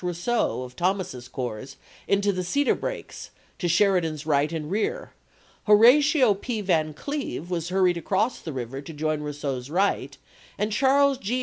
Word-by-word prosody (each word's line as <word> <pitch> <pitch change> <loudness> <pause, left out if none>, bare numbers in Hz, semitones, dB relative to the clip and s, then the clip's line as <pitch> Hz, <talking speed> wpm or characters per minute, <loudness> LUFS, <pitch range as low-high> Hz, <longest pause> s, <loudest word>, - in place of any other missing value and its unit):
Rousseau 180 - -1
of 125 0 -10
Thomas's 175 -9 -2
corps 125 -1 -6 0.3
into 200 +1 +2
the 185 0 -2
cedar 280 +10 +1
brakes - - -6 0.3
to 175 - -1
Sheridan's 170 -4 +2
right 150 0 +1
and 160 -1 -5
rear; 220 - -2 0.5
Horatio 250 +4 +6
P. 220 +3 -4
Van 160 -6 0
Cleve 275 - -5
was 170 -1 -2
hurried 185 -2 +2
across 205 +7 0
the 160 - -6
river 130 0 -5
to 160 +3 -9
join 155 0 -1
Rousseau's 145 -3 -4
right, 190 +6 0 0.4
and 210 +1 -1
Charles 275 +3 +3
G. 240 +4 -2
180 Hz, 150 wpm, -25 LUFS, 150-220 Hz, 0.5 s, Horatio